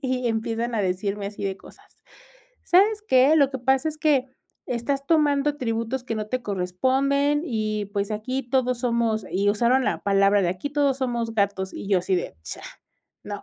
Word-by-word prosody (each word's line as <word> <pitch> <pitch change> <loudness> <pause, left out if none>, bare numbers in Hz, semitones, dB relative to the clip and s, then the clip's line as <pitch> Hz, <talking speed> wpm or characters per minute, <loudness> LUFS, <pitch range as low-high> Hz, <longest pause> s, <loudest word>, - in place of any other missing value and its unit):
y 255 -2 -1
empiezan 230 +1 -2
a 215 - +1
decirme 200 +2 -2
así 200 0 -6
de 195 -1 -2
cosas: - - -17 0.8
"¿Sabes 415 +4 +4
qué?, 260 +4 +5
lo 280 -3 +4
que 265 - -4
pasa 265 +5 +1
es 310 - -5
que 290 -4 +2 0.4
estás 270 +3 -2
tomando 295 -3 +3
atributos 245 -2 -3
que 235 - -3
no 215 -1 -3
te 255 +1 -2
corresponden 265 +10 +1
y, 215 -6 -2
pues, 200 0 -1
aquí 255 +6 -3
todos 250 0 0
somos". 235 -3 0
Y 200 +2 +1
usaron 235 +5 +2
la - - -1
palabra 200 0 +3
de: 175 - +1
"Aquí, 185 +10 -5
todos 285 -2 +1
somos 235 -3 -2
gatos". 200 -2 0
Y - - -7
yo 195 -2 +4
así 180 +2 -1
de: 175 - -4
"Cha, 80 - -8 0.6
no". - - -6
235 Hz, 185 wpm, -24 LUFS, 205-270 Hz, 0.8 s, qué